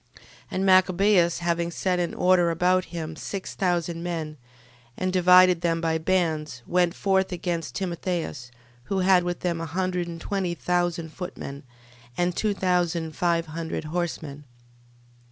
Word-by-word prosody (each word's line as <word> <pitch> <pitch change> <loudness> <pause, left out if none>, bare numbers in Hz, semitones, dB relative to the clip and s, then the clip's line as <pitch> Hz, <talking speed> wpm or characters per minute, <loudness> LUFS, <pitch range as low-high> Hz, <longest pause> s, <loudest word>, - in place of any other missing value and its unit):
12:20. - - -18 0.3
And 190 +1 -1
Machabeus 185 -1 +4
having 170 0 0
set 180 +1 -1
in 175 -1 -2
order 180 -1 +4
about 180 +2 +2
him 160 -2 -6
six 195 +4 -6
thousand 175 -2 -1
men, 165 -3 -4 0.6
and 185 0 -1
divided 180 -1 +6
them 165 -1 +1
by 165 -1 0
bands, 160 -7 -1
went 175 0 +1
forth 190 -1 +1
against 170 -2 -3
Timotheus, 170 -8 -3 0.4
who 195 -1 -1
had 185 -1 +4
with 175 0 -4
him 170 -2 -1
a 165 - -4
hundred 180 +1 -1
and 170 -1 -7
twenty 185 -1 -2
thousand 175 -2 -1
footmen, 140 -6 -7 0.6
aad 175 0 0
two 210 -2 0
thousand 175 -4 0
five 170 -1 +1
hundred 160 +1 -5
horsemen. 155 -3 -4
175 Hz, 145 wpm, -25 LUFS, 165-185 Hz, 0.6 s, divided